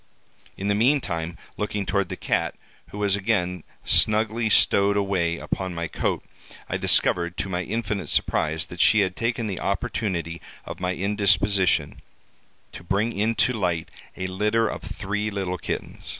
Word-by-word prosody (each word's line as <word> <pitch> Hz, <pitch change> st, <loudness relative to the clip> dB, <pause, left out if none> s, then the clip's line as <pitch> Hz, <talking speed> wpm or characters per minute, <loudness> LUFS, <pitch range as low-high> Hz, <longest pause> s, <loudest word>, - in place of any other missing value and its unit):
In 100 Hz, -, -3 dB
the 100 Hz, -, +3 dB
meantime, 100 Hz, -, +1 dB, 0.2 s
looking 105 Hz, -1 st, -2 dB
toward 95 Hz, 0 st, 0 dB
the -, -, -3 dB
cat, -, -, -1 dB, 0.3 s
who -, -, -9 dB
was 100 Hz, -1 st, +2 dB
again 90 Hz, -5 st, 0 dB, 0.2 s
snugly 110 Hz, +1 st, +3 dB
stowed 100 Hz, 0 st, +4 dB
away 90 Hz, -4 st, +1 dB
upon 95 Hz, 0 st, -3 dB
my 85 Hz, 0 st, -2 dB
coat, -, -, -1 dB, 0.4 s
I -, -, -1 dB
discovered 85 Hz, 0 st, +2 dB
to 95 Hz, -, -2 dB
my 90 Hz, -1 st, -1 dB
infinite 105 Hz, +1 st, -3 dB
surprise, 80 Hz, +2 st, +1 dB
that 90 Hz, -2 st, -4 dB
she 110 Hz, -, +6 dB
had 95 Hz, -2 st, 0 dB
taken 115 Hz, 0 st, -1 dB
the 100 Hz, -4 st, -3 dB
opportunity 90 Hz, -4 st, -2 dB, 0.2 s
of -, -, -7 dB
my 90 Hz, 0 st, -1 dB
indisposition 100 Hz, 0 st, +2 dB, 0.7 s
to -, -, -10 dB
bring 100 Hz, +6 st, 0 dB
into 115 Hz, +5 st, +2 dB
light 90 Hz, -7 st, -1 dB, 0.3 s
a 95 Hz, -, -3 dB
litter 105 Hz, +4 st, +1 dB
of -, -, -4 dB
three 105 Hz, +2 st, -3 dB
little 95 Hz, -3 st, -3 dB
kittens. -, -, -5 dB
100 Hz, 150 wpm, -25 LUFS, 90-105 Hz, 0.7 s, she